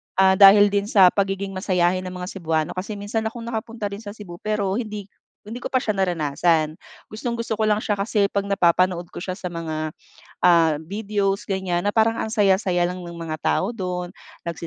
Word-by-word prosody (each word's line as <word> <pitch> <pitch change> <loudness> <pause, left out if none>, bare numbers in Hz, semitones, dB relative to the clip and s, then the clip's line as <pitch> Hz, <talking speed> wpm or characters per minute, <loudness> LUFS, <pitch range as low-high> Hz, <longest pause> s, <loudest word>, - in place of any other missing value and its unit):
ah, 190 0 +5
dahil 205 +1 +8
din 200 0 0
sa 190 -4 +6
pagiging 195 0 -1
masayahin 185 -1 +1
ng 185 - -7
mga 180 +1 -5
Cebuano 160 -4 -1
kasi 200 +3 -5
minsan 215 +2 -2
akong 230 +1 -7
nakapunta 225 -2 -4
rin 200 - -6
sa 205 -1 -9
Cebu 175 -5 -10
pero 210 -2 -1
hindi 210 -3 -5 0.4
hindi 220 +4 -8
ko 250 - -7
pa 255 - +3
siya 210 -2 -2
naranasan. 160 -2 +1 0.3
Gustong-gusto 230 0 -3
ko 220 - +1
lang 215 0 +2
siya 205 -1 -1
kasi 200 0 +1
'pag 200 0 -1
napapanood 180 -2 +2
ko - - -12
siya 185 +1 -4
sa 180 -1 -6
mga, 160 -2 -4 0.5
ah, 165 -3 +5
videos 200 +1 -2
ganyan 190 -2 -1
na 205 - 0
parang 225 0 +3
ang - - -1
saya-saya 190 -4 +2
lang 180 - -6
ng 170 - -8
mga 165 -2 -5
tao 190 +8 0
do'n 180 -5 -4 0.3
nagce 170 0 -5
195 Hz, 190 wpm, -23 LUFS, 175-210 Hz, 0.5 s, dahil